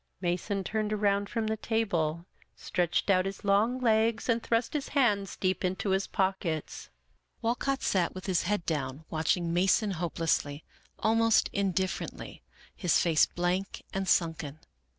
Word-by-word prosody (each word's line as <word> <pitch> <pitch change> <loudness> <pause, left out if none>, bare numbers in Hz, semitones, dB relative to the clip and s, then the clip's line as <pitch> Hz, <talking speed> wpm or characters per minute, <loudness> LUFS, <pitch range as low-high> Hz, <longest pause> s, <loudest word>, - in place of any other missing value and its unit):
Mason 185 +3 -1
turned 215 +2 -2
around 200 -1 +1
from 225 -2 -1
the 220 0 -1
table, 175 -8 -1 0.3
stretched 175 +2 0
out 185 0 +3
his 195 - -7
long 210 +5 +2
legs, 225 -1 +2
and 230 -1 +2
thrust 230 +1 0
his 295 -3 -2
hands 205 -7 +2
deep 185 0 0
into 185 +2 -1
his 195 +1 +1
pockets. 190 -5 -2 0.5
Wal 230 +1 +2
cott 275 +2 -2
sat 185 -2 +1
with 185 - -7
his 185 -3 +1
head 205 -4 0
down, 145 -1 -3
watching 165 +2 0
Mason 190 +4 +3
hopelessly, 160 -4 -1 0.3
almost 225 0 +3
indifferently, 190 -1 -2 0.3
his 180 -5 +2
face 165 -3 +4
blank 180 +3 -2
and 195 0 -2
sunken. 160 -4 +1
195 Hz, 145 wpm, -29 LUFS, 175-220 Hz, 0.5 s, face